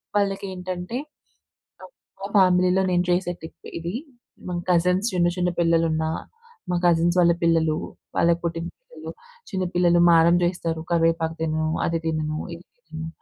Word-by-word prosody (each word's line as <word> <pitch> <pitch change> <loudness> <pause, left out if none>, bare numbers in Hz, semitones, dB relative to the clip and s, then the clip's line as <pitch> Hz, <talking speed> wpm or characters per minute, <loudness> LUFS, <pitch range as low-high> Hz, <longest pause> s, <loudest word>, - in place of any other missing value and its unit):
వాళ్ళకి 200 -1 0
ఏంటంటే 180 +4 -5 1.2
మా 195 - -4
ఫ్యామిలీలో 185 0 +4
నేను 175 0 +2
చేసే 175 0 +1
టిప్ 160 - -12
ఇది. 170 +2 -4 0.6
మా 180 - -3
కజిన్స్ 180 +4 +2
చిన్న 175 -1 +2
చిన్న 180 0 +1
పిల్లలున్న, 165 -1 +2 0.7
మా 180 - +1
కజిన్స్ 170 0 +3
వాళ్ళ 170 -1 +5
పిల్లలు, 160 -2 +2 0.4
వాళ్ళకి 170 0 +3
పుట్టిన 165 0 -2 0.2
పిల్లలు - - -10 0.4
చిన్న 190 -3 -1
పిల్లలు 175 -1 +4
మారం 170 +1 +5
చేస్తారు 170 -2 -2
కరివేపాకు 165 -1 +1
తినను, 155 0 0 0.2
అది 165 0 0
తినను, 155 -1 -1 0.2
ఇది 170 - -13 0.2
తినను 160 0 -6
170 Hz, 135 wpm, -24 LUFS, 165-180 Hz, 1.2 s, వాళ్ళ